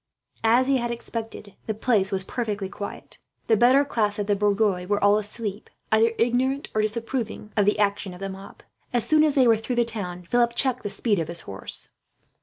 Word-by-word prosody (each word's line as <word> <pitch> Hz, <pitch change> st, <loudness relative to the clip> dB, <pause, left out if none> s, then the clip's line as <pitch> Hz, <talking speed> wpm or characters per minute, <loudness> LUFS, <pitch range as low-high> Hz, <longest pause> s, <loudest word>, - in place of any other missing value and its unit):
As 235 Hz, +3 st, +4 dB
he 270 Hz, 0 st, +3 dB
had 240 Hz, -1 st, -2 dB
expected, 225 Hz, -3 st, -6 dB
the 220 Hz, -, -1 dB
place 215 Hz, -3 st, +1 dB
was 190 Hz, -1 st, 0 dB
perfectly 210 Hz, -2 st, -3 dB
quiet. 200 Hz, +1 st, -8 dB, 0.3 s
The 225 Hz, -, +4 dB
better 255 Hz, +6 st, +5 dB
class 210 Hz, -6 st, 0 dB
of 205 Hz, -, -1 dB
the 205 Hz, 0 st, +1 dB
bourgeois 200 Hz, -2 st, +1 dB
were 205 Hz, 0 st, 0 dB
all 205 Hz, +1 st, +5 dB
asleep, 210 Hz, 0 st, -5 dB, 0.2 s
either 225 Hz, +1 st, +4 dB
ignorant 255 Hz, +4 st, +1 dB
or 215 Hz, -, +2 dB
disapproving 225 Hz, 0 st, -3 dB
of 205 Hz, -2 st, +3 dB
the 205 Hz, -, +3 dB
action 200 Hz, -1 st, 0 dB
of -, -, -12 dB
the 195 Hz, -, -4 dB
mob. 195 Hz, +1 st, -10 dB, 0.3 s
As 240 Hz, -2 st, 0 dB
soon 310 Hz, 0 st, +5 dB
as 300 Hz, -2 st, +2 dB
they 260 Hz, -3 st, +5 dB
were 225 Hz, -1 st, +5 dB
through 225 Hz, +3 st, -3 dB
the 240 Hz, 0 st, +3 dB
town, 180 Hz, -6 st, -5 dB
Philip 235 Hz, +4 st, +2 dB
checked 255 Hz, -1 st, +1 dB
the 205 Hz, -, -4 dB
speed 205 Hz, -1 st, 0 dB
of 165 Hz, -, -2 dB
his 170 Hz, 0 st, -2 dB
horse. 100 Hz, 0 st, -7 dB
220 Hz, 210 wpm, -25 LUFS, 200-240 Hz, 0.3 s, better